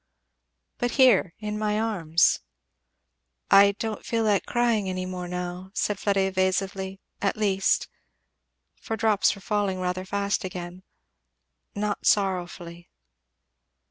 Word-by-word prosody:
"But 245 - 0
here 240 -10 +5
in 210 0 -4
my 210 0 0
arms." 170 -7 +2 1.1
"I 200 0 +7
don't 215 +1 -5
feel 230 -1 -1
like 205 -3 +1
crying 235 -5 +1
any 185 0 -3
more 180 -1 -5
now," 180 +1 -5
said 205 -2 -1
Fleda 200 -1 +1
evasively; 190 0 -1 0.2
at 200 - 0
least." 195 -3 +1 0.9
for 225 - -5
drops 215 -2 +2
were 195 - -13
falling 200 -2 -1
rather 185 0 -2
fast 200 +1 -1
again, 180 -1 -6 0.5
" - - -52
not 205 0 -2
sorrowfully." 175 -3 -1
195 Hz, 120 wpm, -26 LUFS, 185-210 Hz, 1.1 s, I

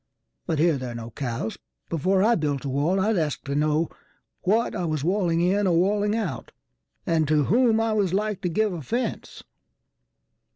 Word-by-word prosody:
But 160 - 0
here 160 -2 +3
there 125 -2 -5
are - - -8
no 115 0 -7
cows. 115 -3 -4 0.3
Before 185 +4 +1
I 230 +3 +4
built 145 - -1
a - - -2
wall 150 +8 +1
I'd 210 0 +2
ask 150 -3 -2
to 140 - -6
knowWhat 155 +8 -1
I 185 - -3
was 155 -4 -2
walling 175 -2 +1
in 195 +3 +2
or 170 -2 +3
walling 205 +3 +2
out, 200 -11 -4 0.5
And 160 -2 +1
to 150 0 +3
whom 230 - +3
I 225 -1 +1
was 200 -4 +1
like 210 +1 -1
to 180 - -1
give 210 +3 +1
offence. 220 - -4
175 Hz, 175 wpm, -25 LUFS, 150-205 Hz, 0.5 s, I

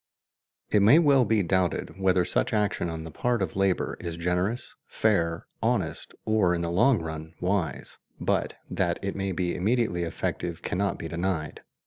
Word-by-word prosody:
It 105 - +4
may 110 +10 +7
well 140 -6 +5
be 110 -3 +2
doubted 95 +1 0
whether 95 -2 +3
such - - 0
action 105 -5 0
on 80 -1 -5
the 80 - -8
part 120 +9 0
of 95 -5 -2
labor 95 -1 +1
is 85 -1 -5
generous, 90 +7 -1
fair, 85 -7 +1 0.2
honest, - - -1
or 105 -5 +3
in 85 - -2
the 85 - -2
long 110 +8 +4
run 80 0 -6
wise; 90 -9 -2 0.2
but - - 0
that - - 0
it - - -2
may 95 0 -2
be 90 -1 -1
immediately 110 -2 +1
effective 85 0 -3
cannot 100 +2 -1
be 80 - -5
denied. 85 -2 -3
90 Hz, 165 wpm, -27 LUFS, 85-105 Hz, 0.2 s, may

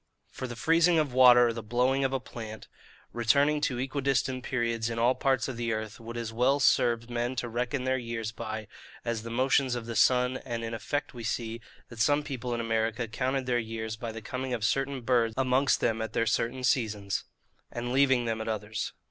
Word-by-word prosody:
For 130 - -5
the 120 - -7
freezing 165 +6 +3
of 150 -5 +1
water, 125 -1 +8
or - - -2
the 115 - -5
blooming 125 +5 +1
of 135 - +1
a 135 - 0
plant, 110 -3 -9 0.5
returning 140 +6 +3
at 150 - +1
equidistant 130 0 -1
periods 115 -3 -1
in 115 - -4
all 120 +2 +4
parts 130 -3 +1
of 130 -3 -5
the 115 -1 -1
earth, 110 -1 -5
would 115 +1 -7
as 115 -1 -4
well 130 +5 +3
serve 115 -3 +3
men 120 +1 -2
to 120 -1 -2
reckon 125 +3 -2
their 130 0 +1
years 115 -2 -4
by, 110 -1 -6 0.4
as 115 -2 -1
the 115 - -7
motions 130 +1 +2
of 120 -2 -5
the 115 0 -5
sun: 125 +1 +3
and 115 -3 -5
in 115 0 -4
effect 145 +6 -3
we 120 -2 -8
see, 115 +1 -3 0.3
that 120 - -11
some 145 +5 +3
people 130 -4 -5
in - - -3
America 115 0 -1
counted 130 +3 -1
their 125 -1 +1
years 110 -1 -4
by 115 +1 -5
the 110 0 -8
coming 130 +2 -3
of 110 -2 -2
certain 135 +1 0
birds 115 -2 +2
amongst 135 +1 +2
them 110 -1 +1
at 110 -1 -4
their 115 - +1
certain 120 +3 -1
seasons, 105 -6 0 0.5
and 120 0 -4
leaving 130 -2 +4
them 110 -1 -2
at 110 - -5
others. 110 -1 -3
120 Hz, 210 wpm, -29 LUFS, 115-130 Hz, 0.5 s, water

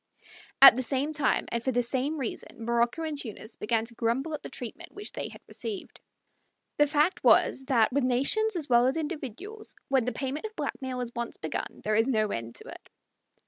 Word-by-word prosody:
At 275 - +12
the 255 - -1
same 275 +4 -1
time, 295 -3 +1
and 235 0 -2
for 260 - +1
the 245 0 +1
same 265 +6 -1
reason, 230 -3 -5
Morocco 235 +6 +1
and 310 -2 -2
Tunis 225 -4 -6
began 225 +1 0
to 235 - -10
grumble 235 +7 -1
at 300 - -4
the - - -7
treatment 265 +7 -7
which 410 +1 -6
they - - -5
had - - -13
received. 410 -5 -6 0.8
The 295 - +5
fact 300 +5 +1
was 265 - +4
that, 240 -4 +3
with 285 0 +2
nations 280 - +2
as 315 -4 -2
with 250 +3 +4
individuals, 320 - -6
when 265 -3 +3
the 250 - 0
payment 280 +10 -3
of 435 - -17
blackmail 260 -2 -3
is 240 -1 -4
once 235 0 -4
begun - - -5
there 215 - 0
is 225 +3 +3
no 215 -5 +1
end 115 0 -5
to - - -9
it. - - -12
260 Hz, 200 wpm, -28 LUFS, 235-300 Hz, 0.8 s, At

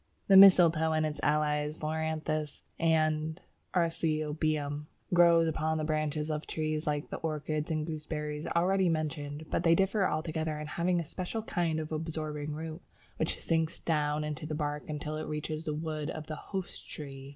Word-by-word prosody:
The 195 - +8
Mistletoe 170 -5 +8
and 155 0 +2
its 150 -1 -3
allies, 150 0 +1
Loranthus 155 -1 -2 0.2
and 155 0 +1 0.4
Arceuthobium, 155 -3 0 0.3
grow 170 -1 +7
upon 160 -1 0
the 155 - -1
branches 155 0 -1
of 150 0 -3
trees 155 -1 -2
like 150 -1 -1
the - - -3
orchids 155 -1 -2
and 155 -1 -1
gooseberries 150 -1 -4
already 185 +2 +2
mentioned, 155 -1 -2
but - - +1
they 165 -1 +5
differ 195 +1 +2
altogether 155 -1 -2
in 150 - -5
having 175 +3 0
a 170 - -3
special 185 +8 -4
kind 170 -6 0
of 155 0 -5
absorbing 155 -2 -3
root 160 +2 -6 0.4
which 160 - -1
sinks 160 -1 0
down 150 -2 0
into 150 0 -4
the 155 - -3
bark 150 -1 -3
until 150 0 -3
it 155 - -4
reaches 155 +1 -4
the 150 - -1
wood 155 -1 -3
of 155 -1 -5
the 155 - -5
"host" 190 +3 -6
tree. 135 -2 -8
155 Hz, 165 wpm, -31 LUFS, 150-165 Hz, 0.4 s, The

